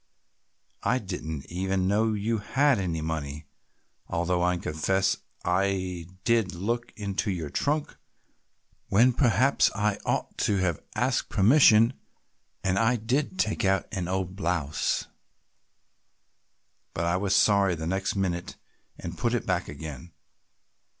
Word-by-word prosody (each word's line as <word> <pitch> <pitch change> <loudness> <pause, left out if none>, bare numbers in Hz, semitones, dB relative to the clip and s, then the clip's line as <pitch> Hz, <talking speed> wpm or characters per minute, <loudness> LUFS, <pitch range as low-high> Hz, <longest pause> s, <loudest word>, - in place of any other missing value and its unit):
I 120 +3 +2
didn't 80 - -5
even 95 +1 -1
know 110 +3 +2
you 110 +2 -1
had 135 +3 +2
any 85 -4 -2
money, 75 -2 -4 0.6
although 90 +1 0
I 90 0 +2
confess 95 +5 0 0.3
I 90 -2 0 0.2
did 115 -6 +1
look 115 +7 -2
into 100 0 -2
your 85 -6 -3
trunk 150 +1 -1 0.9
when 120 +6 +5
perhaps 130 +2 +3
I 105 -2 0
ought - - -2
to 100 - +2
have 90 -4 0
asked - - 0
permission 115 +1 +6 0.7
and 95 0 +1
I 115 +2 +3
did 130 - -1
take 110 - 0
out 95 -1 +2
an 95 -5 -3
old 95 0 -2
blouse, 80 -6 -1 1.9
but 85 - -1
I 85 +1 +1
was 95 0 +1
sorry 100 -3 +4
the 80 0 -5
next 95 +4 -1
minute 90 -3 -2 0.4
and 85 0 -7
put 120 0 +1
it 120 - -2
back 90 -2 -1
again. 80 +2 -8
95 Hz, 130 wpm, -27 LUFS, 85-110 Hz, 1.9 s, permission